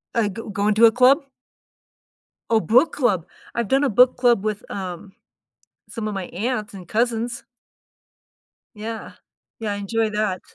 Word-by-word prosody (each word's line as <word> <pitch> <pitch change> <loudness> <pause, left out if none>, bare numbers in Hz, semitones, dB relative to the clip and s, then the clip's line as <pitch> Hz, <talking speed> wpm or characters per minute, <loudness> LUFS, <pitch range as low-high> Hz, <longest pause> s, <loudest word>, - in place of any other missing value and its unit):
Uh, 225 -3 +2
g 205 +3 -7
going 205 +1 +1
to 225 +2 +6
a 225 - +7
club? 255 +5 +5 1.3
Oh, 225 - +4
book 255 +8 +3
club! 205 - +1 0.3
I've 235 -3 -1
done 270 +2 +2
a 280 - +2
book 250 +4 +5
club 240 -5 +3
with, 215 -1 -4
um, 190 0 -6 0.8
some 225 -2 -5
of 210 - -3
my 190 -2 -4
aunts 210 +1 -3
and 185 -3 -10
cousins. 235 +3 -1 1.3
Yeah. 220 +1 -6 0.5
Yeah, 210 -2 -2
I - - -3
enjoy 220 +2 -1
that. 210 -3 -1
220 Hz, 155 wpm, -22 LUFS, 205-240 Hz, 1.3 s, a